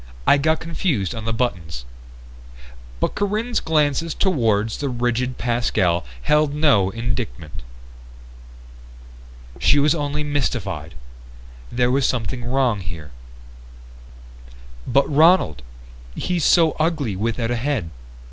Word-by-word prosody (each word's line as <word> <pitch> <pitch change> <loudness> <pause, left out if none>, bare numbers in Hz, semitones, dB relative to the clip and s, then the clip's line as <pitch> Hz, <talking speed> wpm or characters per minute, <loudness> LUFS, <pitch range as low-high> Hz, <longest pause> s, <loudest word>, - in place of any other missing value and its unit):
I 140 - +5
got 160 +2 +2
confused 160 - -1
on 110 -2 -6
the 115 - -1
buttons." 90 - -3 1.1
But - - 0
Corinne's 215 +4 -1
glances 155 0 0
toward 115 - +1
the 140 +5 -3
rigid 125 +1 -1
Pascal 110 -8 +1 0.2
held 150 -1 +2
no 140 -11 +3
indictment. 85 - -4 2.0
She - - +4
was 145 +1 +4
only 150 -1 -2
mystified. 100 - -2 0.8
There 125 0 +1
was 135 0 +2
something 125 0 -2
wrong 125 -3 +1
here. 85 -5 -8 1.8
"But 135 +3 +3
Ronald, 155 - +4 0.5
he's 180 -3 -1
so 165 -3 +5
ugly 155 - 0
without 115 +3 -2
a - - +1
head. 120 - -2
125 Hz, 110 wpm, -21 LUFS, 105-150 Hz, 2.0 s, I